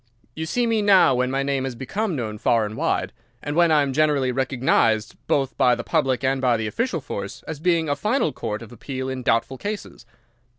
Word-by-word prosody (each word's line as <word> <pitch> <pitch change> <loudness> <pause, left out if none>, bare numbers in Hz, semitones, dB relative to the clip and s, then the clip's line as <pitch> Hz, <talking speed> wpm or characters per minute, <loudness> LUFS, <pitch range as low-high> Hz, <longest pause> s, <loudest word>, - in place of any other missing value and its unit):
You 160 0 -4
see 245 +8 0
me 225 -2 +1
now 195 -9 +5
when 125 0 +1
my 135 +1 0
name 135 -1 -1
has 130 -2 -4
become 190 - -3
known 110 -5 -4
far 115 0 +2
and 105 +1 -6
wide, 95 -3 -1 0.3
and 145 - -3
when 170 0 +4
I 150 -2 +5
am 135 -1 -2
generally 145 -3 +2
recognised 125 -4 +1
both 135 -2 0
by 125 -1 +4
the - - -5
public 135 -6 0
and 135 0 +1
by 125 -3 +3
the 110 - -3
official 180 - -2
force 100 -5 -6
as 160 -3 -6
being 165 -1 +1
a 145 - +1
final 225 - 0
court 110 -3 -4
of 115 - -13
appeal 130 +2 -5
in 130 -1 -4
doubtful 120 +2 0
cases. 205 - -6
135 Hz, 215 wpm, -23 LUFS, 125-160 Hz, 0.3 s, now